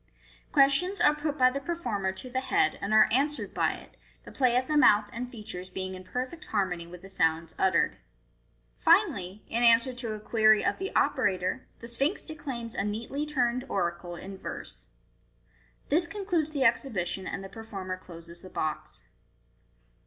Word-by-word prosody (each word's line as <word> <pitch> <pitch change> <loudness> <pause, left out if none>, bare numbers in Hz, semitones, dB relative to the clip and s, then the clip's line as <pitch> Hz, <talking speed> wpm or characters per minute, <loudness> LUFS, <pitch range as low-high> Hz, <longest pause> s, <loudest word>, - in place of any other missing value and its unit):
Questions 300 +7 +4
are 300 -3 +5
put 300 0 -3
by 255 0 +5
the 275 - -3
performer 245 - -2
to 190 +7 -9
the 260 - 0
head, 390 +9 +1
and 200 - -3
are 215 0 +7
answered 290 +5 0
by - - +1
it, - - -13 0.3
the - - -11
play 250 -3 +2
of 255 - +1
the 305 - -1
mouth 210 -8 +5
and 245 +2 -4
features 200 -6 -8
being 185 0 -4
in 185 0 -8
perfect 255 - -5
harmony 180 -5 -1
with 180 +1 -12
the - - -9
sounds 160 -3 0
uttered. 190 -2 +2 0.8
Finally, 185 +3 +2
in 235 - -1
answer 235 +2 +5
to 240 -3 -4
a 215 - -6
query 215 0 +4
of - - 0
the 390 +1 -3
operator, 185 +5 +1
the 230 - -7
Sphinx 275 - 0
declaims 270 -7 -6
a - - -1
neatly 230 +8 -3
turned 250 -4 0
oracle 175 -1 -2
in 190 +2 -9
verse. - - -7 1.0
This 340 +4 +3
concludes 350 -5 -1
the 285 -3 0
exhibition, 200 -7 0
and 195 - -4
the - - -6
performer 195 -4 -6
closes 170 -1 -11
the 185 - -11
box. 155 -3 -4
230 Hz, 170 wpm, -28 LUFS, 190-275 Hz, 1.0 s, are